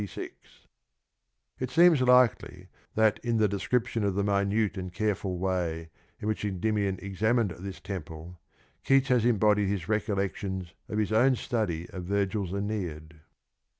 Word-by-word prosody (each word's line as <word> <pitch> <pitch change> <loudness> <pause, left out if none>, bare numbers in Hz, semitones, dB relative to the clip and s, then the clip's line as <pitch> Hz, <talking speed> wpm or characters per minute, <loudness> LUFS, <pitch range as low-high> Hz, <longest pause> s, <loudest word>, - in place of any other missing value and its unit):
266) 100 - -10 1.0
It 130 - -2
seems 165 0 +5
likely 115 -7 +3 0.3
that 110 -1 +3
in 120 -1 0
the 110 -1 +4
description 115 +3 -1
of 100 -2 0
the 100 - +1
minute 100 +1 +1
and 95 -1 -5
careful 100 -1 -2
way 85 -3 -2 0.3
in 105 - -5
which 110 -1 -2
Endymion 100 0 -1
examined 110 +2 +1
this 95 +1 -7
temple^ 90 -3 -7 0.5
Keats 135 0 +3
has 125 -3 +3
embodied 105 -3 +3
his 95 -4 -2
recollections 95 -4 -2 0.2
of 105 - -3
his 110 0 0
own 125 +4 +4
study 100 -9 -2
of 90 -2 -6
Virgil's 100 -1 -1
Aeneid. 90 -6 -4
100 Hz, 140 wpm, -28 LUFS, 95-110 Hz, 1.0 s, seems